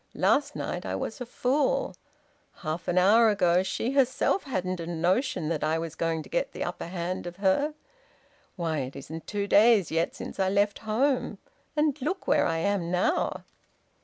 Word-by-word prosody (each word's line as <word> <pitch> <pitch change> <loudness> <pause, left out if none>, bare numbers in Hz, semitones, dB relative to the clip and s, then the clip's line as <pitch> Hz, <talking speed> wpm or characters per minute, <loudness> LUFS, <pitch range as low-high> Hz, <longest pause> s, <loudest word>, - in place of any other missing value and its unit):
Last 290 +1 +2
night - - -4
I - - -3
was - - -5
a 250 - -4
fool. 300 - 0 0.7
Half 160 +2 -3
an 180 - 0
hour 220 +5 +6
ago 180 -4 +3
she 225 +5 -2
herself 275 +7 +2
hadn't 185 -8 -2
a 165 - -5
notion 175 - 0
that 165 -3 -1
I 155 +1 +1
was 165 -1 -4
going 165 -1 -1
to - - -14
get - - -1
the - - -3
upper - - -5
hand 175 0 -4
of 175 - -7
her... 205 - +1 0.8
Why, 165 -4 -1
it 130 0 -5
isn't 160 +4 -8
two 205 -1 -2
days 210 -2 +5
yet 165 +1 0
since - - -8
I 190 -1 +2
left 200 +1 +1
home!... 260 +4 +1 0.4
And 300 -2 +1
look 360 +8 -2
where - - +3
I 165 - 0
am 185 0 0
now!" 185 - 0
190 Hz, 180 wpm, -27 LUFS, 170-260 Hz, 0.8 s, hour